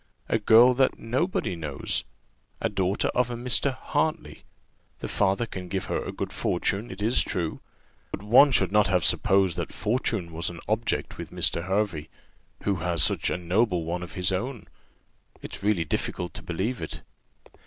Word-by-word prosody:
a 115 Hz, -, +1 dB
girl 115 Hz, +4 st, +7 dB
that 130 Hz, +1 st, +2 dB
nobody 130 Hz, -, -1 dB
knows 75 Hz, -5 st, -2 dB, 0.6 s
a -, -, 0 dB
daughter 95 Hz, 0 st, 0 dB
of 125 Hz, 0 st, +1 dB
a 120 Hz, -, -3 dB
Mr. 125 Hz, +3 st, +2 dB
Hartley. 155 Hz, +4 st, -2 dB, 0.5 s
The -, -, -5 dB
father 100 Hz, +4 st, +1 dB
can 95 Hz, -5 st, -7 dB
give 95 Hz, +1 st, -3 dB
her -, -, -2 dB
a -, -, -5 dB
good -, -, -5 dB
fortune, 100 Hz, +6 st, -1 dB
it 95 Hz, +2 st, -6 dB
is 115 Hz, +3 st, +3 dB
true; 85 Hz, -5 st, -2 dB, 0.5 s
but 95 Hz, -, -6 dB
one 130 Hz, +7 st, +7 dB
should 95 Hz, -7 st, +2 dB
not 105 Hz, 0 st, +4 dB
have 90 Hz, -3 st, +2 dB
supposed 95 Hz, -3 st, +3 dB
that 85 Hz, -, -3 dB
fortune 110 Hz, -6 st, -1 dB
was 80 Hz, +1 st, -1 dB
an 85 Hz, -, -9 dB
object 110 Hz, +2 st, -1 dB
with -, -, -6 dB
Mr. 85 Hz, -, +1 dB
Hervey, 95 Hz, -6 st, -1 dB, 0.5 s
who 100 Hz, -2 st, +1 dB
has 85 Hz, -1 st, +1 dB
such -, -, +1 dB
a -, -, -1 dB
noble 90 Hz, +1 st, +1 dB
one 85 Hz, +2 st, -3 dB
of 85 Hz, -3 st, -8 dB
his 90 Hz, +1 st, 0 dB
own. 115 Hz, +4 st, -3 dB, 0.8 s
It's -, -, -7 dB
really 100 Hz, -5 st, +1 dB
difficult 90 Hz, +3 st, -2 dB
to -, -, -7 dB
believe 95 Hz, -, -3 dB
it." -, -, -6 dB
100 Hz, 175 wpm, -26 LUFS, 90-115 Hz, 0.8 s, girl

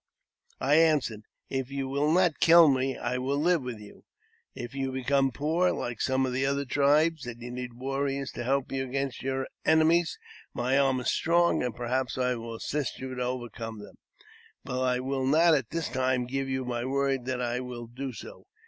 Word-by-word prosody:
I 145 Hz, +3 st, +3 dB
answered, 145 Hz, -10 st, +2 dB
" -, -, -50 dB
If 135 Hz, -1 st, -2 dB
you 135 Hz, -1 st, -3 dB
will 140 Hz, +3 st, +1 dB
not 175 Hz, -2 st, +3 dB
kill 170 Hz, 0 st, +8 dB
me, 130 Hz, -1 st, 0 dB
I 125 Hz, +1 st, -2 dB
will 135 Hz, +2 st, -1 dB
live 170 Hz, +2 st, +2 dB
with 125 Hz, -3 st, -5 dB
you; 105 Hz, -1 st, -14 dB, 0.5 s
if 120 Hz, +1 st, -7 dB
you 135 Hz, -1 st, -2 dB
become 135 Hz, +1 st, +1 dB
poor, 160 Hz, +7 st, +1 dB
like 120 Hz, -1 st, -4 dB
some 130 Hz, 0 st, +1 dB
of 130 Hz, -, -2 dB
the 130 Hz, +1 st, 0 dB
other 140 Hz, +1 st, 0 dB
tribes, 145 Hz, +2 st, +2 dB
and 120 Hz, -1 st, -7 dB
you 120 Hz, +1 st, -7 dB
need 125 Hz, -1 st, -6 dB
warriors 135 Hz, +1 st, -2 dB
to 120 Hz, -, -5 dB
help 135 Hz, +2 st, 0 dB
you 135 Hz, 0 st, -1 dB
against 135 Hz, 0 st, -3 dB
your 135 Hz, 0 st, -2 dB, 0.2 s
enemies, 160 Hz, +2 st, +3 dB, 0.4 s
my 125 Hz, +2 st, +1 dB
arm 135 Hz, -2 st, +3 dB
is 125 Hz, -, 0 dB
strong, 170 Hz, +1 st, +2 dB
and 125 Hz, -2 st, -2 dB
perhaps 125 Hz, +2 st, -2 dB
I 125 Hz, 0 st, +1 dB
will 115 Hz, -1 st, -6 dB
assist 140 Hz, +1 st, -3 dB
you 130 Hz, 0 st, -6 dB
to 125 Hz, -, -4 dB
overcome 120 Hz, -3 st, -4 dB
them; 105 Hz, -, -12 dB, 0.7 s
but 125 Hz, 0 st, -2 dB
I 125 Hz, -1 st, +1 dB
will 135 Hz, 0 st, -2 dB
not 165 Hz, +4 st, +5 dB
at 130 Hz, -7 st, +1 dB
this 165 Hz, -1 st, -2 dB
time 130 Hz, -1 st, 0 dB
give 135 Hz, +2 st, -3 dB
you 130 Hz, -1 st, -2 dB
my 120 Hz, -1 st, -2 dB
word 135 Hz, -1 st, 0 dB
that 130 Hz, -1 st, -2 dB
I 120 Hz, 0 st, -1 dB
will 125 Hz, -2 st, -6 dB
do 130 Hz, +3 st, -6 dB
so. 120 Hz, -, -11 dB
130 Hz, 200 wpm, -28 LUFS, 125-140 Hz, 0.7 s, kill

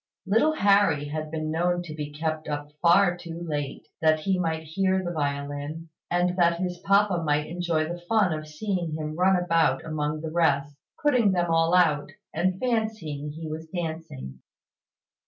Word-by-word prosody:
Little 225 Hz, +11 st, +3 dB
Harry 200 Hz, -, +3 dB
had 155 Hz, +1 st, -4 dB
been 155 Hz, 0 st, -3 dB
known 175 Hz, +2 st, +1 dB
to 160 Hz, -3 st, -8 dB
be 150 Hz, -1 st, -5 dB
kept 155 Hz, +1 st, -3 dB
up 145 Hz, 0 st, -4 dB
far 175 Hz, +1 st, +5 dB
too 170 Hz, -1 st, -8 dB
late, 145 Hz, -3 st, -4 dB
that 155 Hz, -1 st, +3 dB
he 190 Hz, +2 st, +1 dB
might 160 Hz, -2 st, -1 dB
hear 190 Hz, +4 st, 0 dB
the 175 Hz, -, -3 dB
violin, 145 Hz, +1 st, -3 dB, 0.2 s
and 175 Hz, 0 st, +1 dB
that 170 Hz, -1 st, +3 dB
his 180 Hz, -1 st, -3 dB
papa 195 Hz, -1 st, +3 dB
might 150 Hz, -1 st, +1 dB
enjoy 165 Hz, -1 st, -1 dB
the 175 Hz, +1 st, -6 dB
fun 210 Hz, -6 st, +3 dB
of 155 Hz, 0 st, -5 dB
seeing 170 Hz, 0 st, -3 dB
him 155 Hz, 0 st, -4 dB
run 185 Hz, +3 st, +4 dB
about 165 Hz, -6 st, +2 dB
among 150 Hz, -1 st, -2 dB
the 160 Hz, -1 st, -5 dB
rest, 145 Hz, -4 st, +1 dB, 0.3 s
putting 250 Hz, -9 st, +4 dB
them 175 Hz, -2 st, +1 dB
all 165 Hz, +1 st, +3 dB
out, 150 Hz, -5 st, +3 dB, 0.2 s
and 185 Hz, +3 st, 0 dB
fancying 220 Hz, -, -2 dB
he 160 Hz, +1 st, -7 dB
was 160 Hz, +1 st, -6 dB
dancing. 160 Hz, -, -6 dB
165 Hz, 170 wpm, -26 LUFS, 155-180 Hz, 0.3 s, far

